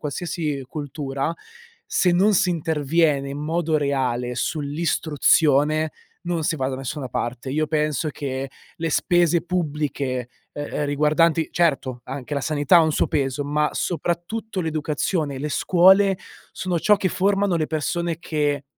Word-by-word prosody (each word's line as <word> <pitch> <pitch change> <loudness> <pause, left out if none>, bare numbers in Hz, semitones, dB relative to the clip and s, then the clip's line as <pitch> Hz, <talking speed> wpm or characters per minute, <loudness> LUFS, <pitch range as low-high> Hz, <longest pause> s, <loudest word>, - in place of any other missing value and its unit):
qualsiasi 150 -2 -3
cultura, 140 0 -3 0.5
se 180 - +2
non 195 +4 +4
si 185 -1 +3
interviene 155 -3 +1
in 140 - -5
modo 160 +1 0
reale 125 -4 -1
sull'istruzione, 155 +1 +2 0.3
non 170 -2 -2
si 155 - 0
va 130 -1 -1
da 130 - -3
nessuna 135 +1 -5
parte. 120 +2 -4
Io 155 +2 0
penso 155 0 0
che 135 -2 -4 0.2
le 165 -1 -3
spese 175 +1 +3
pubbliche, 145 -7 -2 0.2
e 145 - -7
ehm, 145 0 -3
riguardanti 155 +3 +2
certo, 135 -7 +1
anche 135 +2 -5
la 140 - -1
sanità 150 +3 +4
ha - - +6
un 160 - +2
suo - - +1
peso, 140 -1 -1
ma 150 +1 +1
soprattutto 185 +4 -2
l'educazione 155 -1 -1
e - - -5
le 150 +3 -3
scuole 190 +4 +4 0.3
sono 180 -2 -2
ciò 210 -1 +5
che 190 -1 0
formano 195 0 +1
le 155 -2 0
persone 165 +1 -2
che 145 -4 -1
150 Hz, 145 wpm, -23 LUFS, 140-170 Hz, 0.5 s, ha